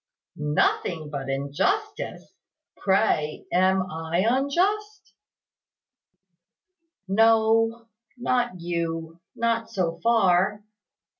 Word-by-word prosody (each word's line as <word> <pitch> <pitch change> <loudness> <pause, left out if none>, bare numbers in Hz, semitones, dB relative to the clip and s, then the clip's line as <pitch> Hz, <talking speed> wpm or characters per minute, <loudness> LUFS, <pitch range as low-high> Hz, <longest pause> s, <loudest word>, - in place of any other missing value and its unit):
"Nothing 150 +1 0
but 135 -2 -5
injustice! 150 - -2 0.4
Pray, 190 -6 0
am 185 +1 +3
I 165 +4 -1
unjust?" 370 - 0 1.9
"No 225 +2 +3 0.3
not 245 -5 0
you 165 -1 -4
not 230 -1 0
so 170 -5 -2
far. 205 -2 +2
190 Hz, 70 wpm, -25 LUFS, 165-230 Hz, 1.9 s, am